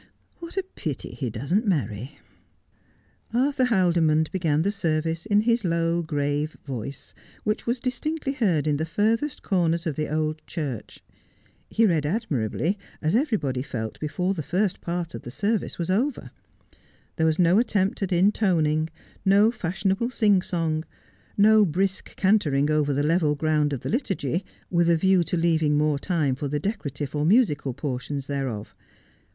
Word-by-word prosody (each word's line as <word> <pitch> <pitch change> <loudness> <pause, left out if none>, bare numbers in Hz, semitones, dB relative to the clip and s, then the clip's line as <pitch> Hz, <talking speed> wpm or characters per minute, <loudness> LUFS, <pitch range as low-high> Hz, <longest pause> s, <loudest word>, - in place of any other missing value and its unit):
' - - -39
What 340 +2 -9
a 385 - +1
pity 160 - -6
he 130 -4 -4
doesn't 150 - -1
marry! 130 - -2 0.6
' - - -36
Arthur 265 +1 +2
Haldimond 170 -8 +2
began 160 -4 +1
the 200 - +1
service 165 -2 -1
in 205 -1 +4
his 235 +1 +1
low, 170 -1 +1
grave 145 -1 -2
voice, 135 0 -6 0.3
which 210 +2 -2
was 240 +1 0
distinctly 270 +4 -2
heard 190 - +1
in 150 -2 +1
the 160 - -1
furthest 225 - 0
corners 170 -3 +1
of 160 -4 -1
the 150 0 -3
old 155 0 -1
church. 145 - -5 0.7
He 225 - +3
read 160 -7 +2
admirably, 165 - -1 0.2
as 160 +5 0
everybody 205 - 0
felt 110 -5 -5
before 180 +5 -1
the 170 - -3
first 185 +5 -1
part 170 -1 -3
of - - -6
the - - -8
service 210 - -1
was 170 +1 -2
over. 250 +9 -1 0.9
There 160 - +3
was 160 0 +1
no 180 +3 +5
attempt 210 -5 0
at 195 -1 -1
intoning, 170 -5 +2 0.3
no 205 +3 +5
fashionable 195 +2 -1
sing 205 -6 +3
song, 165 -3 -1 0.5
no 215 +1 +6
brisk 190 +2 -1
cantering 155 -8 +2
over 150 -1 +2
the 140 +1 0
level 155 -1 +2
ground 150 -1 +1
of 135 -4 -3
the - - -4
liturgy, 195 - -1 0.3
with 170 -1 +3
a 170 - +4
view 190 +1 +3
to 175 - -1
leaving 160 -3 +2
more 150 -1 +2
time 155 -5 0
for 140 +3 -3
the 145 +1 -1
decora 195 -5 -3
tive 140 0 -5
or 150 -1 0
musical 155 - +2
portions 140 0 -4
thereof. 135 -7 -4
165 Hz, 165 wpm, -25 LUFS, 150-200 Hz, 0.9 s, no